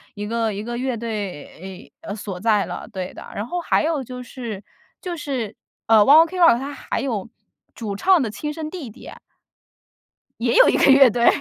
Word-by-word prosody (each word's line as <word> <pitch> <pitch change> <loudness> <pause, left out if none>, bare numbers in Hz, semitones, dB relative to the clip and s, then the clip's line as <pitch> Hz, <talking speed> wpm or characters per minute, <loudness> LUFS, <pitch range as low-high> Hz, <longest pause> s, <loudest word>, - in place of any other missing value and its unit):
一 205 0 -5
个 225 0 -1
一 205 +2 -5
个 240 +1 -5
乐 255 -1 -2
队 195 -4 -7
呃， 205 - -6
所 200 -4 -7
在 210 -1 +2
了。 - - -7
对 185 -2 -5
的， - - -11
然 205 - -3
后 355 +8 -3
还 335 - +1
有 310 -4 -1
就 250 +1 -8
是 230 -5 -7 0.4
就 350 -3 -5
是， 255 -8 -4 0.3
呃 225 - +6
，ONE 290 +9 +8
OK 360 +3 -6
ROCK 330 -9 +6
他 280 +2 -5
还 - - -4
有 230 -5 -3 0.5
主 210 -4 -5
唱 365 - +3
的 235 - -1
亲 300 +8 -5
生 315 -1 -6
弟 320 -8 -7
弟。 215 - -12 1.3
也 - - 0
有 - - +7
一 - - +2
个 275 - +5
乐 270 -2 +7
队。 235 +2 +1
235 Hz, 240 characters per minute, -21 LUFS, 210-290 Hz, 1.3 s, ONE